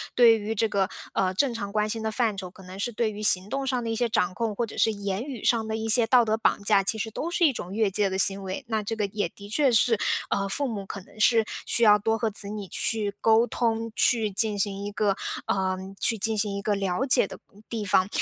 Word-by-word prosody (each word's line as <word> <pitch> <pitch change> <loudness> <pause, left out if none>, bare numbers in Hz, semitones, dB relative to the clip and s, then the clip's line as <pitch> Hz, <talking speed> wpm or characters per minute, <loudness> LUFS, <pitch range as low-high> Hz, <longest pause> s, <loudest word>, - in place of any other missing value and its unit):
对 235 -2 +6
于 215 +2 -4
这 225 +2 +1
个， 195 -2 0 0.2
呃， 185 -1 0
正 250 +6 +1
常 205 -3 -5
关 210 0 +1
心 225 +1 -3
的 220 - -2
范 220 -2 0
畴， 185 -2 -6
可 190 - -16
能 185 +1 -10
是 240 - -1
对 220 0 0
于 210 0 -8
行 195 -2 +4
动 275 +2 -3
上 255 -2 -1
的 230 - -3
一 225 - -1
些 240 +1 0
掌 185 -4 0
控， 225 0 -3
或 235 - -1
者 225 - -11
是 225 - +3
言 200 -1 -3
语 265 -5 -8
上 225 -2 +2
的 220 - -2
一 220 0 -3
些 225 +1 +5
道 245 +1 +5
德 220 -1 0
绑 220 - 0
架， 200 -1 +4
其 200 +3 0
实 220 +1 -4
都 315 - -4
是 345 0 +2
一 300 - +4
种 190 -7 -7
越 215 -1 +1
界 200 0 +1
的 190 - -3
行 195 +1 +2
为。 190 0 -5
那 220 -2 0
这 210 +2 -4
个 215 -2 -1
也 200 -2 -2
的 200 +4 -13
确 275 +6 +2
是， 230 -1 +3 0.3
呃， 195 - -1
父 280 +9 -1
母 210 -5 -5
可 200 +1 -7
能 205 - -18
是 225 0 +4 0.2
需 235 - +1
要 210 -1 +6
多 225 +2 0
和 225 0 -1
子 205 -1 -2
女 205 -1 -6
去 210 -3 -1
沟 225 +1 +4
通， 230 -1 -2
去 225 -4 +2
进 210 +1 0
行 200 0 -2
一 205 - -6
个， 205 -2 0 0.3
呃， 190 -1 0 0.2
去 225 - +1
进 220 +2 -1
行 205 -1 0
一 200 - -4
个 210 +1 0
了 195 +4 -1
解 250 -6 +4
的 - - -10 0.2
嗯， 205 - -18
地 225 -2 -3
方。 185 -1 +2
215 Hz, 290 characters per minute, -26 LUFS, 200-225 Hz, 0.3 s, 对